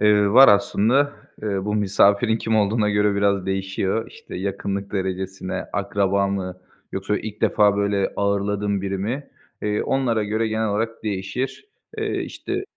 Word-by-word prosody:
Eee, 105 -1 +4
var 135 +4 +9
aslında. 110 +7 +3 0.3
Eee, 100 -3 -2
bu 105 0 -1
misafirin 105 +2 +3
kim 110 0 0
olduğuna 105 0 +2
göre 105 0 +2
biraz 100 -1 +1
değişiyor. 95 +3 -1
İşte, - - -10
yakınlık 100 +1 -3
derecesine, 95 -1 -3
akraba 100 0 +1
mı, 95 -2 -4 0.3
yoksa 100 +2 -1
ilk 105 -1 -7
defa 105 -1 +3
böyle 100 -1 0
ağırladığım 100 0 0
biri 95 0 -2
mi, 120 +9 -4 0.3
eee, 105 0 0
onlara 120 -5 0
göre 110 +2 0
genel 110 0 0
olarak 115 +3 -2
değişir. 105 - -3 0.3
Eee, - - -1
işte 380 +1 -4
100 Hz, 145 wpm, -22 LUFS, 100-110 Hz, 0.3 s, var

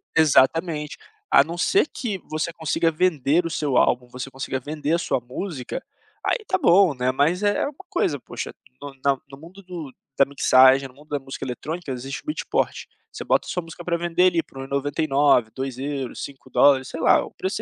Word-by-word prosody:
Exatamente, 155 +1 +3 0.3
a 140 - +7
não 170 +3 -7
ser 385 - +3
que 220 -9 -4
você 155 +2 -2
consiga 165 +1 0
vender 160 -1 +2
o - - -2
seu 145 -5 0
álbum, 125 0 +2
você 125 +2 -6
consiga 135 0 -4
vender 150 +3 -3
a - - +4
sua 170 - -1
música, 130 +2 -5 0.4
aí - - +2
tá 375 - +1
bom, 190 - +5
né, 125 0 0
mas 165 +8 +1
é 205 0 +2
uma 285 - -3 0.2
coisa - - 0
poxa, - - -7 0.3
no 140 -1 -7
na 140 -1 +3
no 135 - -10
mundo 180 +6 -14
do 165 -7 -8 0.2
da 140 - +6
mixagem, 135 -1 +5
no 125 - -19
mundo 150 +3 -18
da 145 -1 -1
música 135 0 -7
eletrônica 155 +6 -5
existe 135 +2 -5
o - - -38
beat 305 - -3
port, - - -1 0.2
você - - -7
bota - - +1
sua 180 - -3
música 165 +1 -10
pra 170 -1 0
vender 175 +1 +1
ali 170 -2 +1
por 135 - -17
1,99, 140 -2 +1
2€, 135 0 -4
$5, 135 -1 +2
sei 165 - -6
lá, - - +4
o - - -12
preço 190 +2 -3
145 Hz, 195 wpm, -23 LUFS, 135-170 Hz, 0.4 s, a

